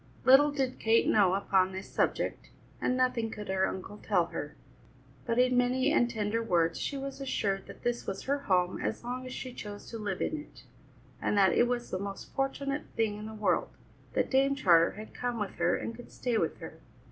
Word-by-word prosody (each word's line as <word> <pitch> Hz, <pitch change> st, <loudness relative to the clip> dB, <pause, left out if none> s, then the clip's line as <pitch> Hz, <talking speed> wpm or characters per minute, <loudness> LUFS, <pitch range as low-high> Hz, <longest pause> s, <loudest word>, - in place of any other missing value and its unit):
Little 275 Hz, +3 st, +7 dB
did 265 Hz, -3 st, -2 dB
Kate 225 Hz, +1 st, +3 dB
know 190 Hz, -3 st, +4 dB
upon 190 Hz, -1 st, +2 dB
this 190 Hz, +1 st, -6 dB
subject, -, -, -1 dB, 0.3 s
and 255 Hz, -, +1 dB
nothing 250 Hz, -3 st, +1 dB
could 210 Hz, -2 st, -7 dB
her 190 Hz, 0 st, +2 dB
uncle 195 Hz, +2 st, -6 dB
tell 180 Hz, -5 st, +2 dB
her; 150 Hz, 0 st, -5 dB, 0.7 s
but 230 Hz, -, 0 dB
in 250 Hz, 0 st, +4 dB
many 250 Hz, +1 st, +2 dB
and 240 Hz, -, +3 dB
tender 220 Hz, 0 st, -1 dB
words 170 Hz, -6 st, +1 dB
she 280 Hz, -, -2 dB
was 275 Hz, 0 st, -6 dB
assured 200 Hz, -7 st, -1 dB
that -, -, -12 dB
this 240 Hz, 0 st, -1 dB
was 195 Hz, 0 st, -4 dB
her 280 Hz, +1 st, 0 dB
home 185 Hz, -8 st, +1 dB
as 220 Hz, -, -3 dB
long 250 Hz, +1 st, -4 dB
as -, -, -7 dB
she 255 Hz, -1 st, -6 dB
chose 205 Hz, -3 st, -8 dB
to 230 Hz, -, -5 dB
live 200 Hz, -3 st, -3 dB
in 315 Hz, -, -1 dB
it, 295 Hz, -, -13 dB, 0.6 s
and 205 Hz, -, 0 dB
that 190 Hz, -3 st, +5 dB
it 240 Hz, -, +4 dB
was 240 Hz, -1 st, -2 dB
the 185 Hz, -, -1 dB
most 200 Hz, 0 st, -6 dB
fortunate 275 Hz, +2 st, -2 dB
thing 220 Hz, -2 st, +1 dB
in 215 Hz, -, -6 dB
the 220 Hz, -, -8 dB
world 210 Hz, -1 st, +1 dB, 0.4 s
that -, -, 0 dB
Dame 275 Hz, +1 st, +3 dB
Charter 170 Hz, -10 st, +5 dB
had 215 Hz, +1 st, -10 dB
come 245 Hz, -2 st, -3 dB
with 205 Hz, -2 st, -4 dB
her 175 Hz, 0 st, +2 dB
and 230 Hz, -, -4 dB
could 245 Hz, -, -12 dB
stay 245 Hz, -2 st, -2 dB
with -, -, 0 dB
her. -, -, -10 dB
225 Hz, 210 wpm, -30 LUFS, 195-255 Hz, 0.7 s, Little